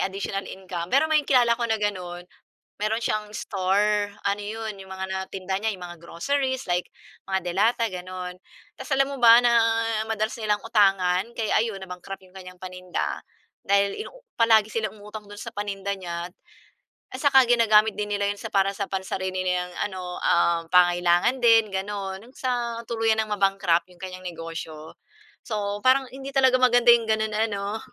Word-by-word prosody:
additional 195 +1 -2
income 180 -3 -6
pero 280 +4 +4
may 310 -1 +3
kilala 245 -3 +5
ko 235 -1 -3
na 220 - +2
gano'n 180 -4 -3 0.6
meron 220 +2 +1
siyang 215 -1 -2
store, 205 +1 0 0.2
ano 200 +1 0
'yon 220 +1 -5
'yong 190 0 -12
mga 190 0 -5
natinda 190 0 -4
niya 220 - +1
'yong 180 -3 -8
mga 175 -1 -10
groceries 260 +10 -2
like, 175 0 -1 0.4
mga 190 0 +1
delata 225 +7 +2
gano'n. 185 -2 -6 0.4
Tas - - -10
alam 270 0 +3
mo - - -6
ba, 230 0 +9
na 240 -1 +3 0.6
madalas 220 0 -1
nilang 210 -2 0
utangan 195 -4 +3 0.2
kaya 220 -2 0
ayun 220 -4 -3
na-bankrupt 190 +1 -8
'yong 185 - -24
kanyang 185 -1 -11
paninda. 185 0 -4 0.4
Dahil 200 0 +2
inuu - - -12 0.2
palagi 220 -2 +4
silang 215 -1 -3
umutang 210 +1 -9
do'n 205 - -10
sa 230 -1 -8
paninda 200 -1 -3
niya 175 -2 -5 0.8
at 255 - -8
saka 265 -3 +6
ginagamit 220 -3 +4
din 210 0 -3
nila 200 0 0
'yon 205 - -1
sa - - -7
para 195 0 +2
sa 200 - -2
pansarili 190 -1 -3
niyang 180 0 -1 0.2
ano, 180 -2 -7
ah, 170 -1 +2
pangangailangan 175 +6 +3
din 225 -3 +5
gano'n 195 0 -4
hanggang 245 +4 -17
sa 240 -2 -2
tuluyan 225 -1 +1
ng 215 - -10
ma-bankrupt 195 -4 +1
'yong 180 - -20
kanyang 185 0 -7
negosyo. 165 -2 -7 0.5
So, 205 -2 -2
parang 260 +1 +3
hindi 270 +1 -8
talaga 260 -1 +4
maganda 245 -1 +6
'yong 235 -1 +4
gano'n 220 0 0 0.2
ano. 200 +1 -3
205 Hz, 170 wpm, -25 LUFS, 185-225 Hz, 0.8 s, ba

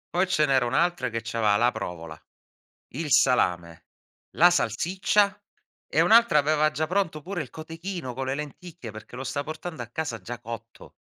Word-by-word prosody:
Poi 185 +2 +3
ce 180 -5 +2
n'era 135 -3 +2
un'altra 150 0 +1
che 115 0 -4
c'aveva 105 -3 +3
la 120 +3 +3
provola, 85 -7 -6 0.8
il 150 0 -2
salame, 85 -11 +2 0.5
la 175 - +8
salsiccia 190 - +1 0.5
e - - +1
un'altra 230 -7 +6
aveva 155 +1 +3
già 155 +1 -2
pronto 175 -3 -1
pure 180 +2 -4
il 130 - -11
cotechino 165 -3 -6
con 135 +2 -3
le 130 +1 -1
lenticchie, 150 -2 -8
perché 110 +3 -11
lo 130 - -5
sta 140 +2 -3
portando 155 -1 -6
a 115 - -9
casa 120 -2 -4
già 120 +5 -7
cotto. 115 -1 -9
145 Hz, 170 wpm, -26 LUFS, 120-170 Hz, 0.8 s, la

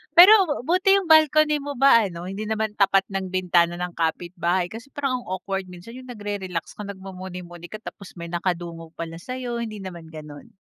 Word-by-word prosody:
Pero 365 - +7
buti 370 +5 +4
yung 390 -3 0
balcony 310 -1 +5
mo 285 0 -5
ba 240 -4 +6
ano, 170 -1 -8
hindi 210 +2 -5
naman 220 -1 -1
tapat 195 0 +4
ng 190 -1 -2
bintana 175 -2 +2
ng 180 0 -4
kapitbahay? 175 +2 -1
Kasi 235 +5 -9
parang 270 -3 -1
ang - - -14
awkward 190 +1 -4
minsan 180 +7 -11
yung 255 0 -11
nagre-relax 205 -7 -5
ka, 210 - -6
nagmumuni-muni 180 -3 -8
ka 215 +3 -9
tapos 200 -4 -10
may 170 -1 -7
nakadungog 170 -2 -4
pala 165 0 -6
sa'yo, 250 +2 -5
hindi 215 -3 -5
naman 170 -3 -8
gano'n? 150 -2 -11
195 Hz, 180 wpm, -24 LUFS, 175-245 Hz, -, Pero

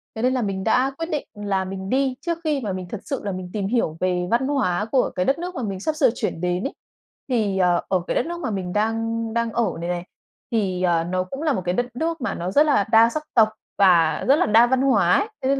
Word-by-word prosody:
Thế 220 - -4
nên 255 +1 +2
là 255 - 0
mình 195 -3 -2
đã 255 +4 +2
quyết 330 +1 -4
định 300 -2 -2
là 200 -2 -2
mình 190 +1 -6
đi 265 0 +1
trước 340 -1 -2
khi 300 -3 0
mà 205 -5 -3
mình 185 -1 -5
thật 215 - -6
sự 275 -4 -4
là 200 - -2
mình 185 -1 -6
tìm 200 -2 -2
hiểu 205 -9 0
về 180 -1 0
văn 245 +3 +2
hóa 210 -9 0
của 265 - +2
cái 180 - -2
đất 275 +4 +1
nước 360 +1 -5
mà 255 - -3
mình 195 -3 -3
sắp 310 +9 -2
sửa 270 -6 +4
chuyển 165 - -3
đến 180 +1 -1
ấy. 275 - -3 0.6
Thì, 210 -6 0
ờ, 180 -2 +3
ở 185 -2 +2
cái - - -1
đất - - +1
nước 345 +1 -5
mà 225 - -3
mình 185 -3 -3
đang 225 +2 0
đang 230 -1 0
ở 235 0 0
này 170 - -3
này, 175 0 -3 0.5
thì, 190 -5 0
ờ, 170 -2 +2
nó 185 +1 -1
cũng 270 +10 -7
là 300 -3 +2
1 185 - -2
cái 180 - 0
đất 245 +2 -2
nước 325 +1 -2
mà 235 - -1
nó 180 +2 -3
rất 295 +6 +5
là 275 -9 +3
đa 230 +1 +7
sắc 305 +4 -4
tộc 220 -2 +5 0.3
và 175 -5 +4
rất 275 - +6
là 360 - +2
đa 225 +3 +5
văn 260 +1 +1
hóa 200 -10 +3
ấy. 420 - -1
Thế 260 - 0
nên 275 0 +2
220 Hz, 275 wpm, -23 LUFS, 185-265 Hz, 0.6 s, đa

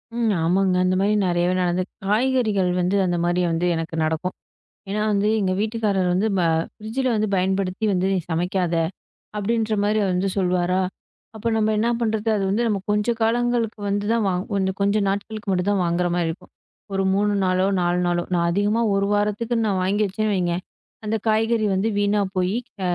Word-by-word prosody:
ம். 235 -2 +1
ஆமாங்க. 185 +2 +2
அந்த 185 - +2
மாரி 205 +2 +2
நிறையவே 175 +1 +1
நடந்திருக்கு. 180 +1 -1
காய்கறிகள் 215 -4 +2
வந்து 180 +3 +1
அந்த 175 -1 0
மாரி 175 +1 +1
வந்து 165 +2 0
எனக்கு 165 0 -4
நடக்கும். 160 +3 -2 0.6
ஏன்னா 210 +1 -1
வந்து, 205 +1 +2
எங்க 190 -2 +1
வீட்டுக்காரர் 210 -4 0
வந்து 190 +4 +1
ப - - +2 0.3
"ஃபிரிட்ஜுல 230 +5 -3
வந்து 215 0 0
பயன்படுத்தி 190 +2 0
வந்து 185 0 +1
நீ - - +2
சமைக்காத." 175 +1 0 0.6
அப்பிடின்ற 220 +1 0
மாரி 215 +1 +2
வந்து 185 +2 0
சொல்வாரு. 180 -1 +1 0.6
அப்போ 220 +2 -2
நம்ம 215 0 +2
என்ன 230 - +1
பண்றது? 220 -1 -1
அது 195 - -1
வந்து 215 +5 +1
நம்ம 210 -3 +1
கொஞ்சம் 210 +3 0
காலங்களுக்கு 235 -1 +1
வந்து 205 +1 -1
தான் 230 -1 +1
வா 190 - +1 0.2
ஒண்ணு, 190 -1 +1
கொஞ்சம் 200 +1 +2
நாட்களுக்கு 205 +1 -4
மட்டும்தான் 190 +1 +1
வாங்குற 175 +1 0
மாரி 175 -2 0
இருக்கும். 160 - -10 0.4
ஒரு 195 - 0
3 205 +1 +2
நாளோ, 185 +1 +2
4 175 0 +1
நாளோ, 175 0 +1
நான் 170 -1 +2
அதிகமா 205 +5 +1
ஒரு 195 0 +1
வாரத்துக்குனு 220 +3 0
நான் 190 -2 0
வாங்கி 205 +3 +1
வச்சேன். 185 -4 -1 0.4
அந்தக் 215 0 -2
காய்கறி 220 0 +2
வந்து 195 +4 +1
வீணா 205 0 +2 0.2
போயி, 185 +4 +1 0.2
க - - -11
200 Hz, 175 wpm, -22 LUFS, 180-215 Hz, 0.6 s, ஆமாங்க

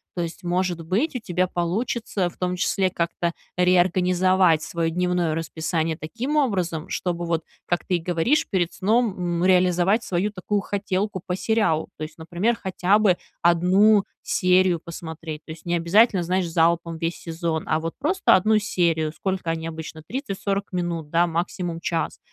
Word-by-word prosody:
То 175 - -1
есть 170 +2 -7
может 175 -1 -1
быть, 230 - 0
у 250 - -1
тебя 185 -3 0
получится 190 +2 -1
в - - -18
том 180 0 -2
числе 190 0 +1
как-то 170 0 -1 0.2
реорганизовать 180 -1 +3
свое 165 0 -2
дневное 180 -2 0
расписание 160 0 -2
таким 240 - -4
образом, 180 - 0
чтобы 175 -1 -2
вот, 165 -1 -1 0.2
как 175 - -1
ты 180 -2 +1
говоришь, 175 - +1
перед 180 -4 0
сном, 220 +1 +1
м, 175 0 -1
реализовать 185 +3 +3
свою 190 +3 -1
такую 205 +1 -2
хотелку 195 -1 -2
по 180 0 -2
сериалу. 210 -9 +1
То - - -5
есть, 155 +1 -8
например, 175 +8 -1
хотя 190 +2 +2
бы 200 -4 +4 0.3
1 185 +5 +4 0.2
серию 180 -1 +3
посмотреть. 160 -1 -7
То - - -8
есть 160 - -16
необязательно, 175 +4 +3
знаешь, 180 +1 0
залпом 165 0 +1
весь 165 +1 -2
сезон, 165 -1 -3
а 155 - +1
вот 165 +1 -4
просто 360 +8 +3
1 215 +3 +3
серию- 165 -6 0
сколько 190 -3 -2
они 165 0 -2
обычно- 160 -1 -7
30-40 200 -6 -3
минут, 170 -4 -2
да, 170 +2 +3
максимум 170 0 -3
час. 165 0 -2
180 Hz, 160 wpm, -24 LUFS, 165-195 Hz, 0.3 s, бы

